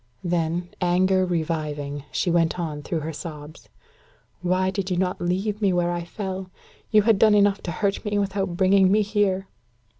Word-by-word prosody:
Then, 175 0 -1
anger 185 +1 +2
reviving, 150 -4 -3
she 175 - 0
went 170 +1 +1
on 155 -3 -3
through 160 +2 -3
her 160 +2 -4
sobs: 150 -1 -9 0.7
"Why 185 +1 +1
did 195 -1 -3
you 180 - 0
not 180 0 -1
leave 195 +5 -1
me 200 -2 +3
where 175 0 +1
I 175 -1 -3
fell? 190 0 -5 0.4
You 215 -2 +5
had 220 -2 +3
done 215 -1 +6
enough 205 -1 +3
to 175 - -4
hurt 200 +3 -1
me 210 -2 -1
without 195 -3 -1
bringing 190 0 +4
me 210 +1 +4
here." 200 -2 0
185 Hz, 175 wpm, -24 LUFS, 170-195 Hz, 0.7 s, done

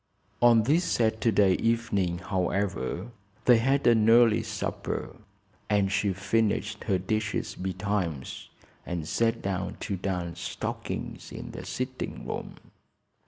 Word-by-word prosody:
On 120 -2 +6
this 155 +9 +3
Saturday 110 - +3
evening, 105 -6 +1
however, 95 - -2 0.3
they 120 -2 +7
had 135 +4 +2
an 115 -2 +5
early 115 -1 +6
supper 110 -1 -4 0.5
and 100 -2 +2
she 100 0 +1
finished 105 +3 0
her 95 - +2
dishes 105 +3 -2
betimes 95 -6 -3 0.3
and 85 -3 -4
sat 115 +3 +1
down 95 -2 -2
to 100 - -2
darn 90 -2 -3
stockings - - -5
in - - -7
the - - -7
sitting 130 0 -4
room. - - -5
105 Hz, 120 wpm, -28 LUFS, 95-115 Hz, 0.5 s, they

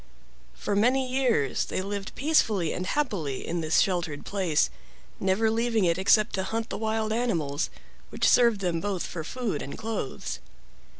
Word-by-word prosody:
For 200 - -2
many 255 +5 +3
years 250 - +1
they - - -3
lived 200 0 -5
peacefully 220 - +2
and 180 - -3
happily 185 - -1
in 170 0 -1
this 155 0 +2
sheltered 170 -6 -1
place, 185 -6 +1 0.5
never 195 +4 +2
leaving 225 -2 +1
it 170 +1 +2
except 210 +2 +4
to 190 - 0
hunt 225 +4 -3
the - - -3
wild 220 0 0
animals, 165 -12 0 0.4
which - - +1
served 235 -4 +5
them 170 -3 0
both 195 -3 -2
for 165 - -5
food 215 - -3
and 140 - -6
clothes. 140 - -4
200 Hz, 160 wpm, -27 LUFS, 165-225 Hz, 0.5 s, served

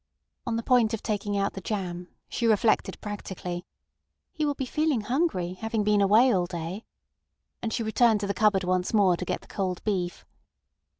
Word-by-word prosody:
On 230 - 0
the 230 - -2
point 235 -3 +3
of 220 - -11
taking 205 -1 -1
out 200 0 0
the 195 - -7
jam, 180 -4 -4 0.2
she 235 - -1
reflected 220 0 +2
practically: 185 -4 -6 0.7
"He 310 -3 -1
will 290 - 0
be 265 - -3
feeling 305 -2 +1
hungry, 210 - 0
having 220 +3 -2
been 210 0 +3
away 220 +6 +5
all 180 -2 +1
day," 175 +4 -5 0.8
and 225 - -2
she 230 - -1
returned 220 0 +3
to - - -1
the 200 - -1
cupboard 205 -2 +3
once 180 +3 0
more 195 -4 +5
to 180 - -5
get - - -2
the - - -18
cold 185 -3 -3
beef. 185 -4 -2
205 Hz, 185 wpm, -27 LUFS, 185-225 Hz, 0.8 s, away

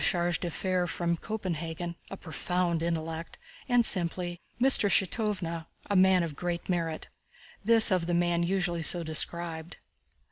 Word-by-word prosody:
Kronq,—chargé 175 -1 +2
d'affaires 180 +1 -2
from 170 0 -1
Copenhagen—a 170 -2 -5
profound 175 0 -2
intellect," 165 0 -4 0.3
and 245 -1 +4
simply, 175 -1 -1 0.2
"Mr. 255 -5 +8
Shítov—a 190 -3 -1
man 185 -1 +5
of 160 -4 -5
great 175 +2 -4
merit"—this 185 +6 -1
of 180 -3 +1
the 175 - 0
man 175 0 +1
usually 175 -1 0
so 170 +1 +1
described. 165 +1 -3
175 Hz, 115 wpm, -28 LUFS, 165-185 Hz, 0.3 s, Mr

